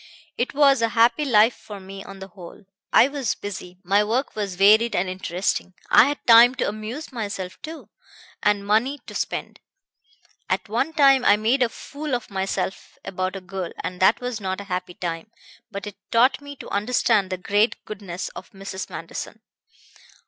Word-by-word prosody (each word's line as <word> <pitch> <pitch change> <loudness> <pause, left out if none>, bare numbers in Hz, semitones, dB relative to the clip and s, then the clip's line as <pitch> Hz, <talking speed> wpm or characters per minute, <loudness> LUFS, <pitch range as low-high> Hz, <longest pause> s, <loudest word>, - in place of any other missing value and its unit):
It 240 - -2
was 275 -3 +5
a 230 - +2
happy 235 +6 +4
life 225 -2 +5
for 205 -2 -10
me 195 +1 -9
on 195 - -10
the 190 0 -9
whole. 180 +2 -12 0.3
I - - +6
was 280 -5 -2
busy, 185 -3 -7
my 200 +3 +3
work 235 +6 -1
was 200 -4 -3
varied 215 +5 +5
and 180 +2 +1
interesting. 185 0 -2 0.2
I - - +8
had 290 +2 -3
time 235 +2 +8
to 255 - -1
amuse 215 +9 -6
myself, 200 -6 -5
too, 320 +1 -9 0.5
and 205 -1 +1
money 225 +7 +2
to - - -10
spend. - - -4 0.9
At - - -1
one 240 +9 -1
time 275 -4 +5
I 205 - +5
made 230 +5 +1
a 245 - +3
fool 285 +3 -5
of 240 -3 -6
myself 190 0 -3
about 185 0 -3
a 195 - -6
girl, 185 -1 -6
and 180 0 -5
that 190 +4 +4
was 245 -3 -4
not 190 0 -3
a - - -6
happy 180 -1 -4
time; 170 +3 -5 0.4
but 200 -2 -6
it 205 -2 -8
taught 255 +4 +4
me 285 0 -9
to - - -10
understand 205 -2 +1
the 185 - -3
great 205 +5 +1
goodness 195 -4 -6
of - - -11
Mrs. 195 -1 -7
Manderson." - - -7
210 Hz, 180 wpm, -23 LUFS, 190-245 Hz, 0.9 s, I